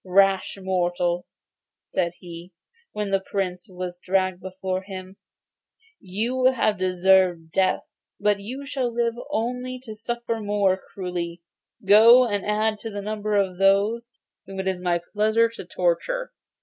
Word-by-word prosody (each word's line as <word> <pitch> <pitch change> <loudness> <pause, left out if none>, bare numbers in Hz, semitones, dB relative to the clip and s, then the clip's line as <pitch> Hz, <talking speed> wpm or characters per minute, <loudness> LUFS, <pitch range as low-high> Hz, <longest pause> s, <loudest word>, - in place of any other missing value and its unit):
'Rash 195 +1 +3
mortal,' 175 -2 0 0.6
said 170 0 -1
he, 175 0 -10 0.4
when 210 -2 -3
the 195 - +3
Prince 190 -2 -3
was 180 -1 -6
dragged 185 0 0
before 185 0 -3
him, 190 -1 -9 0.8
'you 230 +7 -2
have 215 -5 +1
deserved 185 -2 +3
death, 190 +2 +2 0.4
but 205 0 +2
you 255 +8 -7
shall 265 -3 -2
live 235 0 0 0.2
only 250 +3 -2
to 220 -4 -7
suffer 230 +1 -3
more 205 -2 +2
cruelly. 180 -3 -6 0.4
Go, 230 +5 +8
and 205 -3 -1
add 215 +1 0
to 225 - -5
the 205 -1 -5
number 210 0 -2
of 190 -3 +1
those 205 +5 +3 0.4
whom 195 0 -7
it 190 - -2
is 190 -1 -1
my 175 -1 +1
pleasure 220 +2 +3
to 230 - -9
torture. - - -1
195 Hz, 140 wpm, -24 LUFS, 185-225 Hz, 0.8 s, Go